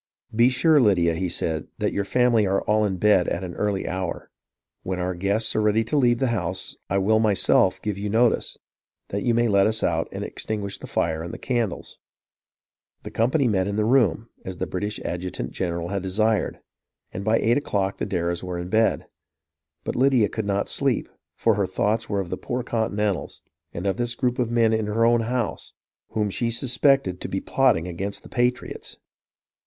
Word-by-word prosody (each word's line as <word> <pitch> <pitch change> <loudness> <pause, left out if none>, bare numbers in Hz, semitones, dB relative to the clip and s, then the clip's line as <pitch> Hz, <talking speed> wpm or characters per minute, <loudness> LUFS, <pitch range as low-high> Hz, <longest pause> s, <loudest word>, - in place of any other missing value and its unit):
"Be 120 +2 +5
sure, 150 +3 +4
Lydia," 90 -7 +3
he 90 +2 -2
said, 80 -2 -2
"that - - -1
your 100 - -1
family 120 -2 +3
are 95 +1 +1
all 105 0 +2
in 95 -3 -1
bed 100 -2 +4
at 85 - -2
an 90 -2 -5
early 105 0 -1
hour. 95 -1 -4 0.5
When 95 0 -3
our 90 +1 -1
guests 100 +5 0
are 110 - +2
ready 105 +1 +3
to 115 - -3
leave 120 -4 +4
the 130 0 0
house 95 -4 -2
I 100 - +1
will 110 +3 +3
myself 100 -3 +3
give 105 -2 -2
you 105 +1 -3
notice, 115 +3 +2 0.5
that 100 - -2
you 120 +1 +1
may 120 0 +3
let 100 -2 +4
us 110 0 -1
out - - +1
and - - -5
extinguish 100 -2 -3
the - - -9
fire 80 -1 -1
and 85 +1 -6
candles." 120 -7 -3 1.0
The - - -7
company 130 +4 +2
met 95 -4 +1
in 100 - -2
the 105 0 +1
room, 115 -4 +2 0.2
as 95 -1 -6
the - - -2
British 105 +3 -4
adjutant 90 -8 -4
general 85 -2 -3
had 100 0 -2
desired; 105 +2 0 0.5
and 95 - -5
by 110 +2 +3
eight 120 +3 +2
o'clock 100 -8 -1
the - - -2
Darrahs 85 -2 -1
were 90 -1 -4
in 90 +1 -5
bed. 110 +3 +2 0.8
But - - -3
Lydia 130 -5 +3
could 110 -2 -4
not 100 0 0
sleep, - - 0 0.3
for 115 - +2
her 100 -2 0
thoughts 105 +4 0
were 100 -1 0
of 95 -3 -4
the 90 - -2
poor 125 0 -3
Continentals, 105 -5 -2 0.3
and 85 - -6
of 95 -2 0
this 120 0 -1
group 125 0 -1
of 120 -2 +1
men 115 -1 +3
in 110 -1 0
her 115 +2 +2
own 120 0 +4
house, 120 0 -3 0.4
whom 105 -2 0
she 115 +4 0
suspected 125 -4 +2
to - - -4
be 95 - -1
plotting 115 -11 +2
against 95 +3 -4
the - - -13
patriots. 125 +1 -2
105 Hz, 195 wpm, -24 LUFS, 95-115 Hz, 1.0 s, Be